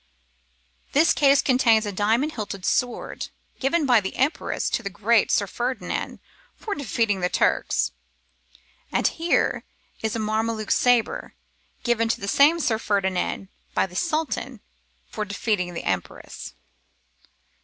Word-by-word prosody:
This 310 +4 +5
case 280 -1 +4
contains 230 -4 +4
a 205 - -2
diamond 225 +9 +1
hilted 205 -6 -5
sword, 245 -1 -1 0.3
given 290 +4 +1
by 245 -5 +5
the 190 - -5
Empress 285 +5 0
to - - 0
the 200 - -4
great 215 +4 +2
Sir 200 - +2
Ferdinand 245 +6 -3 0.4
for 425 - -4
defeating 230 - 0
the 180 0 0
Turks; - - +1 1.0
and - - 0
here 335 +1 +1 0.4
is 220 -1 -1
a - - -2
Mameluke 220 0 -1
sabre, 245 -2 +2 0.5
given 230 -2 +1
to - - 0
the 200 - -5
same 295 +10 +5
Sir 225 -8 +1
Ferdinand 190 -2 -1 0.3
by - - +3
the 180 -1 -12
Sultan 310 - -2 0.5
for 215 - -4
defeating 200 -3 -2
the - - -4
Empress. 95 -2 -4
225 Hz, 135 wpm, -24 LUFS, 200-265 Hz, 1.0 s, This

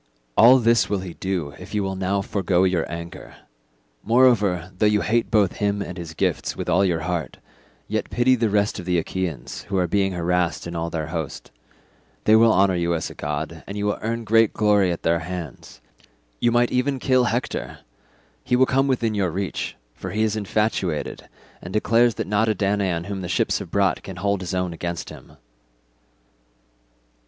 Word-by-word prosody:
All 125 +4 +8
this 115 -1 +3
will 100 -2 -1
he 90 -2 -7
do 90 -7 -3
if - - -8
you 105 - +1
will 95 0 -3
now 95 +1 -1
forgo 95 -2 +1
your 90 -4 0
anger. 85 0 -8 0.7
Moreover, 105 -7 +3
though 105 - +4
you 105 -1 +2
hate 115 +2 +1
both 105 -5 +2
him 100 0 0
and 95 -3 -5
his 85 -3 -8
gifts - - -1
with - - -4
all - - +3
your 85 -4 +1
heart, 85 -1 -3 0.5
yet - - -2
pity 120 +2 +3
the 115 -3 +1
rest 105 0 +1
of 90 - -7
the 90 -1 +1
Achaeans 85 -1 -4
who 100 - 0
are 90 - +2
being 95 0 +1
harassed 90 0 0
in 85 0 -6
all 85 0 -2
their 80 -2 -3
host; 80 -3 -5 0.7
they 110 - +5
will 115 0 +6
honour 95 -2 +3
you 85 -1 0
as 80 - -3
a - - -9
god, - - -4
and 100 - -6
you 105 - -2
will 105 - -1
earn 115 +1 -2
great 115 0 +3
glory 105 -3 +3
at 85 - -5
their 85 0 +2
hands. 85 -4 -8 0.6
You 120 - +2
might 120 0 +2
even 130 +2 +1
kill 130 -1 +2
Hector; 120 +1 -3 0.6
he 125 - +1
will 130 +1 +5
come 135 +2 +1
within 120 -4 0
your 100 -3 0
reach, 95 +3 -3 0.2
for - - -7
he 110 +1 0
is 110 -1 0
infatuated, 100 -5 -2 0.3
and 90 - -8
declares 115 +3 +3
that - - -3
not 105 +2 +1
a 110 - +1
Danaan 95 -3 0
whom 100 -1 -4
the 90 - -5
ships - - +1
have - - -8
brought 100 -2 +1
can 95 - -8
hold 100 +1 -1
his 90 0 -4
own 90 -2 -1
against 85 0 -5
him." - - -13
100 Hz, 195 wpm, -23 LUFS, 90-110 Hz, 0.7 s, All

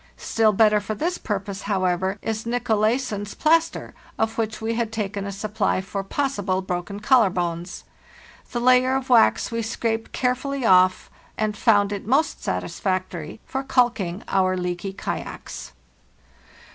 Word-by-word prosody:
Still 220 -1 +2
better 210 0 +4
for 210 +1 -4
this 345 - -2
purpose, 200 -2 -4
however, 190 -1 0
is 220 0 -2
Nicolaysen's 225 -2 0
plas 325 +1 +4
ter, - - -9 0.2
of 220 0 0
which 220 -1 -2
we 225 +1 -2
had 230 -1 -1
taken 200 -2 -3
a - - -4
supply 210 0 -1
for 195 +1 -4
possible 200 -5 -1
broken 180 +2 -4
collar 235 -3 +5
bones. 175 0 -3 0.7
The 240 - -2
layer 255 +1 +4
of 265 -1 -3
wax 240 0 +4
we 230 0 -1
scraped 225 0 -2
carefully 260 +1 -1
off 185 -2 +4 0.3
and 215 -1 -1
found 205 -4 +3
it 200 0 -6
most 275 +7 +1
satisfactory 185 -2 -3
for 265 - -3
calking 240 -9 +1
our 185 -1 +2
leaky 180 +1 -3
kayaks. 195 - -6
215 Hz, 145 wpm, -23 LUFS, 190-240 Hz, 0.7 s, collar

